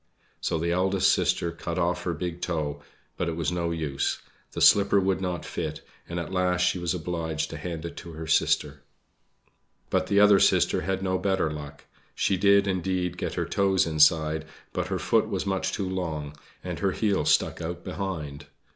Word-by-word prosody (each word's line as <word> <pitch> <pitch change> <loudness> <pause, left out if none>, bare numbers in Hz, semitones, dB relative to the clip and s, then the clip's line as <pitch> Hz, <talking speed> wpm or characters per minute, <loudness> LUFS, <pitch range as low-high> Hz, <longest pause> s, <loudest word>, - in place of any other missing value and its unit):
So - - -1
the 85 +2 -1
eldest 95 +2 +3
sister 85 - +1
cut 85 0 -5
off 90 0 0
her 85 -2 -1
big 90 +2 -4
toe, 75 -4 -2 0.4
but 85 - -1
it 80 - -3
was 85 +1 -1
no 85 -1 -1
use, 80 -5 -1 0.4
the - - -4
slipper 100 0 +6
would 95 -1 0
not 90 -3 -3
fit, 75 -1 -4 0.3
and 85 0 -3
at 85 - -5
last 90 -1 +1
she 90 0 +2
was 85 0 -1
obliged 80 -2 -3
to - - -5
hand 85 -2 -5
it 85 - -7
to 85 -2 -8
her 80 +1 -6
sister. 75 -2 +1 1.1
But - - +1
the 100 - +3
other 105 -1 +7
sister - - +3
had 95 +3 -2
no 95 -1 0
better 95 -5 +1
luck. 75 -1 -9 0.3
She 95 - +1
did, 100 +1 +4
indeed, 90 -2 -1
get - - -4
her 85 - -1
toes 95 +2 +2
inside, 80 0 +3 0.3
but - - -2
her - - -1
foot - - +2
was - - -2
much 95 -1 -1
too 100 - -2
long, 80 -6 -4 0.3
and - - -5
her 95 -2 +1
heel 100 -7 +1
stuck 75 - +2
out - - -5
behind. 75 -7 -5
85 Hz, 190 wpm, -26 LUFS, 80-95 Hz, 1.1 s, other